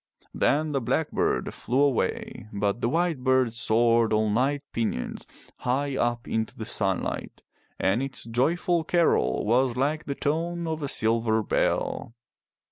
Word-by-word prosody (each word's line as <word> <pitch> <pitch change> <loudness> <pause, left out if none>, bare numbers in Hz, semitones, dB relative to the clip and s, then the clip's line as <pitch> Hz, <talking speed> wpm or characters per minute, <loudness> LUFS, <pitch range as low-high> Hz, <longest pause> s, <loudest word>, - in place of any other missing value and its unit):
Then 155 +2 +1
the 135 -2 0
blackbird 115 - 0
flew 125 +4 -1
away 135 -5 -1
but 100 +2 -1
the 115 - +1
white 165 0 +1
bird 130 -3 +3
soared 115 0 +3
on 110 -1 +2
light 140 +5 +1
pinions 110 - -3 0.3
high 135 +2 -1
up 120 -2 -1
into 110 0 -2
the 110 - -5
sunlight 100 -4 -2 0.4
and 100 +6 +2
its 135 -2 -4
joyful 160 +9 +1
carol 160 - +2
was 120 +3 +2
like 150 +4 0
the 140 - -3
tone 170 +4 -1
of 160 -1 -3
a 145 - -2
silver 110 -2 +1
bell. 115 - -1
125 Hz, 140 wpm, -26 LUFS, 110-145 Hz, 0.4 s, bird